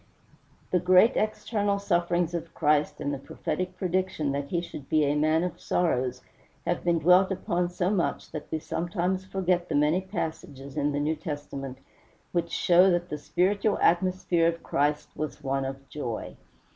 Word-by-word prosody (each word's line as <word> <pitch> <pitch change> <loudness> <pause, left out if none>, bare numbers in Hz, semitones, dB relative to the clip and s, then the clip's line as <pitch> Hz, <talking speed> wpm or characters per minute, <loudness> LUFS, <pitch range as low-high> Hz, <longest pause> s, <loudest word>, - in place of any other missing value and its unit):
The 180 - +3
great 185 +7 +5
external 210 -1 0
sufferings 175 -3 +1
of 170 -1 -5
Christ 150 -1 +2
and 145 - -2
the 140 - -4
prophetic 185 +6 -4
prediction 185 -5 -1
that 140 0 -2
he 170 - 0
should 160 -5 -8
be 155 -1 +3
a 140 - +2
"man 155 +2 +2
of 180 - -4
sorrows" 130 -7 0 0.4
have 175 - -1
been 170 -1 +2
dwelt 180 +4 +5
upon 175 -1 -1
so 180 +1 0
much 190 -5 -1
that 155 -2 -6
we 160 - -1
sometimes 175 +3 -2
forget 180 -2 0
the - - 0
many 150 +5 +3
passages 155 -7 -5
in 145 -1 +1
the 145 - -1
New 150 +2 0
Testament 145 -4 -6 0.5
which 175 -1 0
show 180 +2 +5
that 175 0 0
the 150 - -4
spiritual 200 +7 +1
atmosphere 175 -1 +2
of 170 0 -2
Christ 145 +1 0
was 155 0 -5
one 135 0 -1
of 135 0 -6
joy. 125 -5 -5
170 Hz, 170 wpm, -27 LUFS, 150-185 Hz, 0.5 s, great